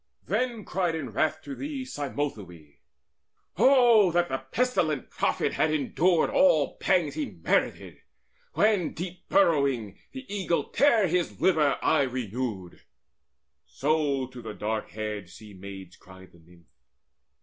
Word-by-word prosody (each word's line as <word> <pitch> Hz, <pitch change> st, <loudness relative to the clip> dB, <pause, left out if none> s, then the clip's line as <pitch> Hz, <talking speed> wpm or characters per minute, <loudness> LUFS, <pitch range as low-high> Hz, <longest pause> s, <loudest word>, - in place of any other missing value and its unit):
Then 240 Hz, -4 st, -2 dB
cried 175 Hz, -3 st, -1 dB
in 140 Hz, -7 st, -5 dB
wrath 155 Hz, +7 st, -1 dB
to 140 Hz, -, -7 dB
these 270 Hz, -, -6 dB
Cymothoe: 105 Hz, -, -5 dB, 0.8 s
"O 235 Hz, -4 st, +5 dB
that 175 Hz, +1 st, +1 dB
the 135 Hz, 0 st, -2 dB
pestilent 170 Hz, -, 0 dB
prophet -, -, 0 dB
had 155 Hz, -, +1 dB
endured 160 Hz, +3 st, +1 dB
All 160 Hz, -, +3 dB
pangs 175 Hz, -6 st, +1 dB
he 300 Hz, -3 st, -3 dB
merited, -, -, -2 dB, 0.5 s
when, 205 Hz, -5 st, +2 dB
deep 180 Hz, +2 st, -8 dB
burrowing, 140 Hz, -, +2 dB
The 265 Hz, -1 st, -9 dB
eagle 190 Hz, -4 st, -2 dB
tare 235 Hz, -8 st, +3 dB
his 175 Hz, 0 st, -1 dB
liver 155 Hz, -6 st, +3 dB
aye -, -, +3 dB
renewed!" 120 Hz, -7 st, -4 dB, 0.9 s
So 145 Hz, -2 st, 0 dB
to 125 Hz, -1 st, -11 dB
the 105 Hz, -, -7 dB
dark 110 Hz, +1 st, -3 dB
haired 105 Hz, -4 st, -5 dB
Sea 105 Hz, +3 st, -13 dB
maids 95 Hz, -1 st, -10 dB
cried 95 Hz, 0 st, -16 dB
the 85 Hz, -, -20 dB
Nymph. 85 Hz, +1 st, -21 dB
150 Hz, 130 wpm, -27 LUFS, -, 0.9 s, O